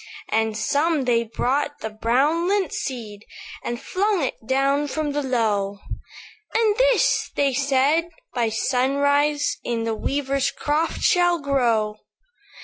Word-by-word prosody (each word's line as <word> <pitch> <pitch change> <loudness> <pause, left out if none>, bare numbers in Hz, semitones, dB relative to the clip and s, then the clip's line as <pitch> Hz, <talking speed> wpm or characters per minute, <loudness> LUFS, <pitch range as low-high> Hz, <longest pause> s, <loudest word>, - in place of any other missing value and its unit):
"And 220 -1 0
some 295 +5 +1
they 235 -2 +2
brought 270 +6 -1
the 220 - -4
brown 270 +10 +1
lint 390 -4 0
seed, 220 -6 -5 0.4
And 240 0 -3
flung 395 -2 0
it 265 - -1
down 275 +2 +1
from 300 +1 -2
the 290 +1 -1
Low; 215 -6 0 0.8
'And 440 -2 +3
this,' - - +3
they 280 -2 +2
said, 285 +5 +2 0.2
'by 235 -2 +1
sunrise, 285 +5 +1
In 230 -1 -2
the 225 0 -1
weaver's 275 +4 -1
croft 305 +3 -1
shall 350 -1 +4
grow. 235 -7 +1
275 Hz, 130 wpm, -23 LUFS, 235-295 Hz, 0.8 s, shall